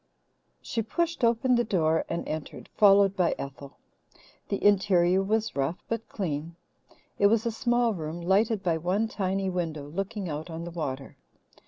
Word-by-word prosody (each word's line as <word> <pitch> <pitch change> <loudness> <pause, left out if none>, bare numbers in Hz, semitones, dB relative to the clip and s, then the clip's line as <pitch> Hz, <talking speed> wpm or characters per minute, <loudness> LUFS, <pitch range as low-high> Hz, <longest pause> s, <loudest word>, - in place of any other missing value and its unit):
She 230 - -2
pushed 335 +7 -2
open 235 +2 +3
the 240 0 +3
door 165 -7 +1
and 170 - -3
entered, 155 -1 -6
followed 200 -1 +5
by 180 -3 +1
Ethel. 140 0 -8 0.7
The 200 - -2
interior 190 -2 +4
was 215 +3 -1
rough 140 +5 -2
but 230 -1 -4
clean. 165 -3 -4 0.6
It 200 - +6
was 225 +2 +2
a 235 - +1
small 240 0 +1
room, 160 -2 -5
lighted 195 +4 +1
by 165 -2 +1
one 190 +7 0
tiny 195 -2 -2
window 160 -5 -3
looking 195 +5 -4
out 155 +2 -5
on 165 0 -6
the 175 - -6
water. 140 -5 -5
190 Hz, 160 wpm, -27 LUFS, 165-220 Hz, 0.7 s, It